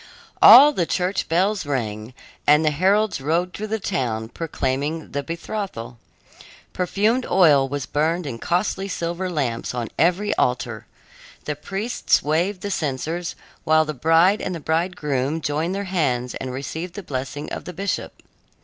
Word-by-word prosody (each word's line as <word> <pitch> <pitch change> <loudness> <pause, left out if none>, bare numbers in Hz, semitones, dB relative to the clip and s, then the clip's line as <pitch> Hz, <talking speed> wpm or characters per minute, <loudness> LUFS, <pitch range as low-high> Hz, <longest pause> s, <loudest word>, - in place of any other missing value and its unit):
All 290 +4 +10
the 175 - 0
church 185 +2 -1
bells 195 +5 +1
rang, 115 -5 -4 0.3
and 150 +2 +5
the 155 - +3
heralds 195 +3 +2
rode 170 +6 0
through 215 - -5
the 220 +1 -2
town 115 - -2
proclaiming 150 +1 -3
the 140 - -2
betrothal. 165 - -6 0.7
Perfumed 210 +7 +1
oil 150 -7 +5
was 140 -2 -3
burned 160 +6 0
in 120 -5 -5
costly 190 - -1
silver 175 0 -3
lamps 130 -8 -2
on 120 -2 -3
every 180 +5 +2
altar. 125 -3 -1 0.6
The 150 - -2
priests 200 +10 0
waved 175 +6 0
the 205 0 -4
censers, 160 +3 -3 0.3
while 155 0 +4
the 155 - -4
bride 165 - +3
and 185 - -3
the - - -5
bridegroom 155 -3 -1
joined 160 +4 -1
their 200 - -2
hands 135 -10 -1
and 130 - -5
received 160 +7 -5
the 205 - -6
blessing 135 0 -5
of - - -6
the 180 - -7
bishop. 195 +3 -4
160 Hz, 150 wpm, -22 LUFS, 135-185 Hz, 0.7 s, All